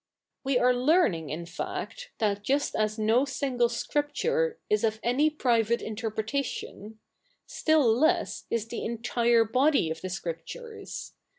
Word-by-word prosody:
We 270 -2 +2
are 250 0 +4
learning^ 245 - +2
in 165 +3 -4
fact, 485 - -6
that 205 -3 0
just 280 +6 0
as 215 0 0
no 220 +4 +3
single 260 -3 0
scripture 450 - -1
"is 425 -1 +1
of 220 0 +1
any 260 +6 +3
private 235 -6 +1
interpretation; 220 0 -4 0.2
" - - -42
still 315 -2 +2
less 255 +10 +2
is 230 -1 -1
the 235 - -5
entire 235 0 +2
body 255 - +2
of 160 - -5
the 185 - -4
Scrip 170 -3 -4
tures. 465 - -8
240 Hz, 140 wpm, -28 LUFS, 215-290 Hz, 0.2 s, are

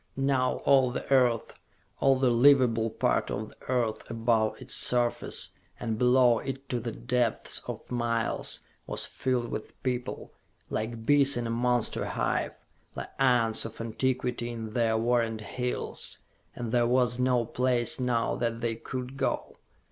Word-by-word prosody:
Now 135 -2 +2
all 135 -2 +5
the 125 - -5
earth, 125 -4 +3 0.5
all 135 -1 +4
the 130 -1 +2
livable 120 -3 +4
part 110 - 0
of 105 +1 -3
the - - -19
earth, 115 -4 -1
above 115 -1 +1
its - - -3
surface 120 -1 +1 0.3
and 110 -2 -3
below 125 -1 +5
it 135 0 -6
to 125 - -1
the - - -4
depths 110 - -1
of - - -7
miles 120 -2 -1 0.3
was - - 0
filled 125 -2 -1
with 110 - -6
people, 125 -1 -3 0.4
like 115 +1 -3
bees 140 -1 +5
in 120 - -2
a 115 - -2
monster 120 0 +1
hive, - - -1 0.4
like - - -6
ants 120 -4 +3
of 115 0 -8
antiquity 120 +1 -1
in 115 -2 -6
their 115 -2 +2
warrened 115 -1 +1
hills. 125 +4 -4 0.4
And 120 -2 -4
there 120 -1 +3
was 125 0 +2
no 125 -2 +2
place 125 +1 +1
now 120 -2 0
that 115 -1 -1
they 115 -2 -1
could 130 +2 -6
go. - - -2
120 Hz, 150 wpm, -28 LUFS, 115-125 Hz, 0.5 s, all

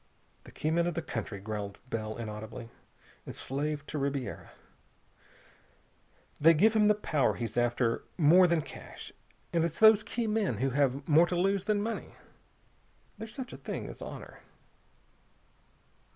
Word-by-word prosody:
"The - - -12
key 155 - -2
men 170 +1 +2
of 175 - -2
the 170 - -2
country," 110 -7 -4
growled 100 -1 -5
Bell 110 -1 -3
inaudibly, 110 +1 -7 0.6
"enslaved 145 +2 -3
to 150 - -3
Ribiera. 140 -2 -3 1.9
They 165 +2 +7
give 215 +8 +5
him 210 -1 +5
the 210 - +5
power 155 -10 +1
he's 115 -3 -4
after 120 -1 +1
more 175 +3 +6
than 170 -3 +1
cash. - - -10 0.4
And 165 -1 +3
it's 170 -1 -2
those 220 -1 +7
key 235 +2 -3
men 210 - 0
who 135 +4 0
have 140 0 +1
more 165 +3 +6
to 180 - -2
lose 195 +2 +1
than 210 -1 +1
money. 225 +1 -4 1.0
There's 220 0 -7
such 260 -2 -6
a - - -7
thing - - -5
as - - -9
honor...." - - -8
150 Hz, 150 wpm, -30 LUFS, 120-195 Hz, 1.9 s, They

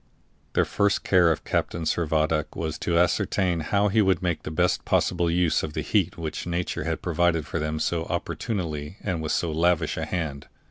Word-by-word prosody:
The - - +3
first 100 0 +1
care 90 -3 +4
of 80 - -2
Captain 85 - -1
Servadac 80 -1 0
was 80 -2 -3
to 85 -1 0
ascertain 90 0 +2
how 100 +6 +1
he 110 +2 +3
could 95 -2 +2
make 85 -3 0
the - - -6
best 90 +3 +1
possible 85 -1 +1
use 85 -1 +2
of 75 - -5
the 80 - -2
heat 90 +3 0
which 80 0 -4
nature 85 +1 -2
had - - -2
provided 85 -2 +1
for 85 - -3
them 75 +1 -2
so 80 +1 -1
opportunely 85 -3 -3
and 90 -5 -2
with 80 - -2
so 85 - 0
lavish 80 0 +1
a - - -2
hand. 80 -6 -3
85 Hz, 190 wpm, -25 LUFS, 80-90 Hz, -, care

